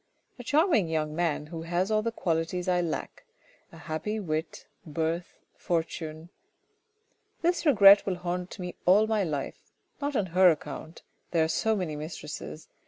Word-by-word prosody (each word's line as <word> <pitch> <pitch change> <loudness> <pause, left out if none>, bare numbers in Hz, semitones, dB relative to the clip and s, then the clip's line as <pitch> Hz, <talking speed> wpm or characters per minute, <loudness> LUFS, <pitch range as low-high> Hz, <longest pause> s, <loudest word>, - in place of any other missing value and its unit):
A - - -7
charming 295 - +3
young 155 -1 -2
man 165 -3 0
who 165 +1 -7
has 175 +4 -1
all 215 0 +3
the 230 +1 -2
qualities 175 -2 -1
I 180 -1 +2
lack. 170 - -4 0.5
A 165 - -13
happy 165 +7 -3
wit, 160 -4 -4 0.2
birth, 165 +2 -3 0.2
fortune 165 -1 -3 0.5
" 445 +1 -45
This 345 -1 +1
regret 200 -7 +8
will 190 - 0
haunt 180 0 -4
me 180 -1 -5
all 200 +4 +6
my 220 -2 +1
life, 150 -6 -4 0.4
not 285 0 -2
on 205 - +2
her 185 0 +7
account, 155 0 -4
' - - -45
there 165 -2 +2
are - - +1
so 220 +7 +1
many 180 -6 -3
mistresses 155 0 -7
175 Hz, 165 wpm, -28 LUFS, 160-210 Hz, 0.5 s, regret